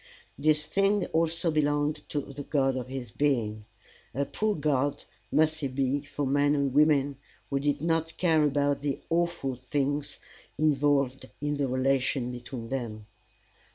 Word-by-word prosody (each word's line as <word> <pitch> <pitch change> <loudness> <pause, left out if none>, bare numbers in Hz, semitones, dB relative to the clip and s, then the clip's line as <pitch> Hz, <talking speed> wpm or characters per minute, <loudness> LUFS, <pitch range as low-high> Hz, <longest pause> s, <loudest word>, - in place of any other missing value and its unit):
This 150 +1 +2
thing 195 +2 +2
also 165 +1 +1
belonged 145 0 +1
to 145 - -1
the 140 +1 -8
God 135 -2 +1
of 125 -1 -4
his 130 -4 -6
being. 110 -7 0 0.5
A 140 +1 +1
poor 215 +8 -1
God 145 -2 0 0.3
must 155 0 +3
he 140 - -1
be 135 +1 0
for 145 0 -3
men 145 +2 +3
or 140 -1 +1
women 145 -1 +3 0.3
who 140 - +1
did 145 +1 0
not 165 -1 0
care 160 -3 +3
about 145 -1 +1
the 145 -2 -1
awful 170 -5 0
things 140 +3 -2 0.4
involved 140 -3 +2
in 145 0 -1
the 140 -1 0
relation 130 -1 +1
between 120 -1 -7
them! 115 -5 -4
145 Hz, 150 wpm, -28 LUFS, 135-150 Hz, 0.5 s, must